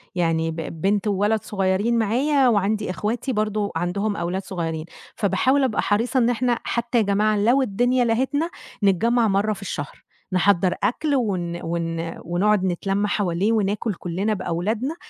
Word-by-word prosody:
يعني 165 -2 +1
ب 160 - -7 0.3
بنت 205 +2 +1
وولد 205 +2 +1
صغيّرين 195 +4 0
معايا 260 +5 +2
وعندي 210 -2 +1
إخواتي 225 +7 -2
برضه 215 -1 -1
عندهم 200 +5 -1
أولاد 180 +2 -2
صغيّرين، 165 -4 -4 0.3
فباحاول 235 +7 +2
أبقى 245 -5 +1
حريصة 230 +6 0
إن 235 0 +3
إحنا 245 0 +1
حتّى 235 0 -1
يا 225 - +4
جماعة 210 +1 +2
لو 240 +7 +3
الدنيا 245 +2 +1
لهتنا 265 +8 0 0.3
نتجمّع 225 +5 +3
مرّة 205 +2 +1
في 210 - -11
الشهر، 145 -7 -6 0.3
نحضّر 185 -1 +3
أكل 290 +4 +1
ون 185 -9 -1
ون 165 0 -3
ونقعُد 190 +4 +2
نتلَم 195 +3 0
حواليه 195 0 0
وناكُل 210 0 0
كُلّنا 185 +5 -2
بأولادنا 210 - -2
205 Hz, 145 wpm, -23 LUFS, 185-235 Hz, 0.3 s, يا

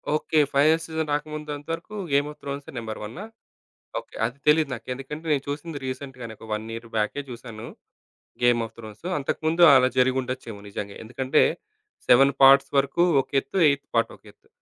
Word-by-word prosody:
Okay. 155 0 +1
Final 155 +4 +4
season 160 -1 -3
రాకముందంతవరకు, 150 +5 -5 0.2
'game 140 +1 +3
of - - -16
త్రోన్సే' 140 0 -6
number 110 -2 -5
వన్నా? 120 - -7 0.8
Okay, - - -15
అది 120 +4 -4
తెలీదు 150 -1 +4
నాకు. 115 -2 -8
ఎందుకంటే 150 +5 -8
నేను 140 -2 +1
చూసింది 145 +2 -5
రీసెంట్‌‌గానే 130 -3 -6
ఒక 105 -1 -2 0.2
ఇయర్ 115 0 -8
బ్యాకే 110 +7 0
జూసాను 115 -2 -8 0.7
'గేమ్ 120 -1 +4
ఆఫ్ - - -12
త్రోన్సు.' 110 - -8
అంతకుముందు 160 +4 +1
అలా 130 -1 +6
జరిగి 130 +1 +3
ఉండొచ్చేమో 125 -4 -6
నిజంగే. 100 0 -6
ఎందుకంటే, 130 +3 +1 0.7
సెవెన్ 135 +3 +6
పార్ట్స్ 135 +1 +7
వరకు 140 +5 +2 0.2
ఒక - - -16
ఎత్తు, 190 - -6
ఎయిత్ 140 0 -1
పార్ట్ 115 - +2
ఒకెత్తు. - - -20
135 Hz, 155 wpm, -25 LUFS, 120-150 Hz, 0.8 s, పార్ట్స్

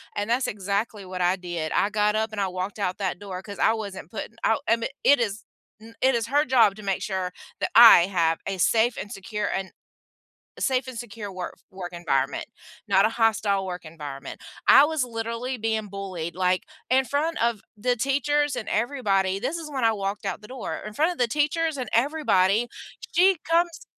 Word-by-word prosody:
and 205 +2 -2
that's 245 +2 +1
exactly 200 +1 -2
what 185 0 -5
I 180 +1 +3
did, 175 -4 -4
I 205 - +2
got 210 0 +1
up 220 0 0
and 205 -2 -3
I 195 - +1
walked 185 +3 -5
out 185 -2 -1
that 185 -2 -2
door 190 -2 -6
'cause 200 -1 -9
I 225 - +4
wasn't 200 -7 -6
putting 220 +2 -7
out, 225 +5 +2
I 230 - +5
mea 230 - -3
it 285 -2 +6
is 215 -2 -2 0.4
n 230 +1 -14
it 260 -1 +4
is 230 -1 -1
her 290 +2 +3
job 235 -6 +4
to 215 - -11
make 195 -1 -1
sure 185 -2 -2 0.3
that - - -2
I 225 -6 +9
have 165 -4 +1
a 195 -1 -2
safe 225 +6 +2
and 205 - -6
secure 210 +2 -4
and 190 0 -3 0.9
a - - -12
safe 260 -1 +1
and 255 -3 -7
secure 210 -4 -7
work 180 -1 -6
f - - -31
work 185 -2 -7
environment, 135 -5 -1 0.4
not 195 0 +4
a - - +2
hostile 215 -4 +1
work 180 -1 -6
environment. 145 -3 -8 0.3
I 280 - +9
was 315 -2 0
literally 230 +2 -4
being 220 -2 -2
bullied, 185 -4 -5
like, 185 0 +1 0.3
in 265 +1 +4
front 315 +4 -1
of 230 -3 0
the 245 +4 0
teachers 285 +3 +1
and 215 - -5
everybody- 200 -6 0
this 270 +8 -2
is 320 -2 -7
when 265 -4 -3
I 225 - +4
walked 200 0 -3
out - - -3
the 210 - -12
door. 255 -2 -5
In 215 - -6
front 320 +7 +2
of - - -10
the 245 - +3
teachers 300 +4 0
and 255 - -3
everybody, 235 -5 +2 0.5
she 370 0 +5
comes 335 -1 0
215 Hz, 210 wpm, -25 LUFS, 190-250 Hz, 0.9 s, I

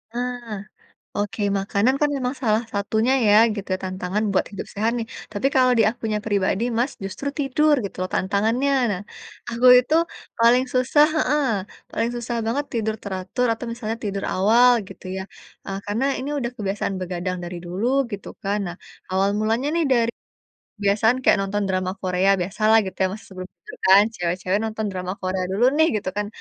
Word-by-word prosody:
Ah, 245 -3 -4 0.6
oke, 205 +1 -2 0.2
makanan 200 +5 +1
kan 295 - +3
memang 255 -1 -2
salah 220 -1 +2
satunya 220 +4 +1
ya, 205 - +5 0.2
gitu 200 -2 -6
ya, - - -3
tantangan 185 +2 -2
buat - - +2
hidup 200 - -6
sehat 215 +3 +1
nih. 225 - -3 0.3
Tapi 210 +5 -1
kalau 255 -1 +5
di - - +6
akunya 225 -2 -3
pribadi 200 -1 +1 0.2
Mas, 250 +4 +1
justru 200 +9 -4
tidur 295 +2 +3
gitu 200 - -6
loh 185 - -3
tantangannya. 225 +8 +1 0.2
Nah, 185 0 -4 0.5
aku 235 +2 +1
itu 250 +5 +1 0.4
paling 235 +2 +5
susah 265 +4 +4
heeh, 295 -1 +2 0.5
paling 230 +1 -1
susah 240 0 -3
banget 270 +6 0
tidur 220 -1 0
teratur 190 +5 -2
atau 235 +2 -8
misalnya 225 -2 -4
tidur 200 -1 -3
awal 230 +6 +5 0.2
gitu - - -12
ya. 190 - -3 0.4
Eee, 195 0 -4
karena 210 +5 -1
ini 265 - -4
sudah 240 -4 -2
kebiasaan 200 -1 -2
begadang 180 0 -3
dari 175 +1 -6
dulu 185 +6 -2 0.3
gitu 200 - -6
kan. 200 +1 0
Nah, 175 0 -6 0.4
awal 195 +1 +2
mulanya 225 +6 0
nih, 335 - +2
dari 235 -2 +3 0.7
kebiasaan 210 +4 +3
kayak - - +5
nonton 205 +1 -1
drama 185 -1 -1
Korea, 185 +1 +1
biasalah 215 +4 +3
gitu 190 - -6
ya, - - +3
Mas, 210 +3 -8
sebelum 185 -1 -8
tidur - - -11
kan 195 +2 +8
cewek-cewek 180 +2 -1
nonton 220 0 -3
drama 185 0 -4
Korea 185 0 -1
dulu 200 +5 0
nih, 315 0 +5
gitu 190 - -4
kan. 210 0 -1
210 Hz, 175 wpm, -23 LUFS, 190-240 Hz, 0.7 s, kan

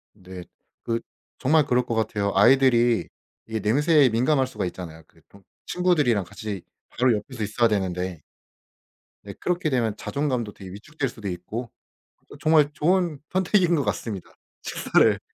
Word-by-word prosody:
네 95 -2 -10 0.4
그 115 0 -1 0.4
정말 150 +3 +3
그럴 125 -1 +2
것 120 - -3
같아요. 105 -2 0
아이들이 120 +1 +4 0.4
이게 110 0 -3
냄새에 140 - +4
민감할 130 +4 +2
수가 105 -6 -4
있잖아요. 80 -3 -8
그 - - -25
통 100 0 -19 0.2
친구들이랑 150 - +2
같이 100 0 -6 0.3
바로 125 -1 +2
옆에서 125 +1 -6
있어야 115 +3 +2
되는데. 90 -5 -2 1.0
네 - - -8
그렇게 180 -2 -1
되면 115 -6 0
자존감도 130 -7 -2
되게 95 -2 -11
위축될 135 +7 -4
수도 110 -3 -8
있고 105 +7 -6 0.6
어 - - -11
정말 155 -2 +4
좋은 170 -1 +1
선택인 185 -1 +2
것 145 - 0
같습니다. 100 -6 -4 0.3
식사를, - - +2
120 Hz, 325 characters per minute, -24 LUFS, 100-150 Hz, 1.0 s, 아이들이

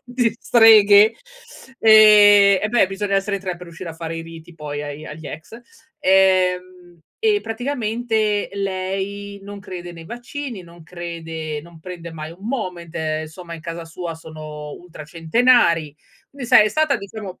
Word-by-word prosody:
di 245 -2 0
streghe, 215 -2 +6 0.6
ehm, 205 -2 +7
eh 210 - 0
beh, 240 -3 +3
bisogna 195 +1 -3
essere 200 +1 -1
in 195 - -10
3 185 -2 -3
per 180 - -14
riuscire 170 +1 -9
a - - -10
fare 165 0 -6
i 165 - -5
riti 165 +1 -12
poi 150 -2 -6
ai 145 +1 -7
agli 155 0 -9
ex. 155 +9 -9 0.4
Ehm, 185 -2 +1 0.2
e 425 -2 +2
praticamente 225 -3 -2
lei 195 +1 -4
non 200 0 -9
crede 175 -2 -8
nei 165 -1 -12
vaccini, 240 -2 -7
non 170 -1 -16
crede 165 -2 -6
non 170 -1 -15
prende 170 -1 -9
mai 155 0 -7
un 195 +5 -12
Moment, 180 -10 -5
ehm, 155 -1 -3 0.3
in 165 - -10
casa 170 -1 -6
sua 165 0 -6
sono 155 -2 -9
ultracentenari. 165 - +1 0.4
Quindi 275 -4 -8
sai 210 - +7
è 215 - +1
stata 310 +2 +1
diciamo 200 -1 -9
185 Hz, 155 wpm, -20 LUFS, 165-210 Hz, 0.6 s, ehm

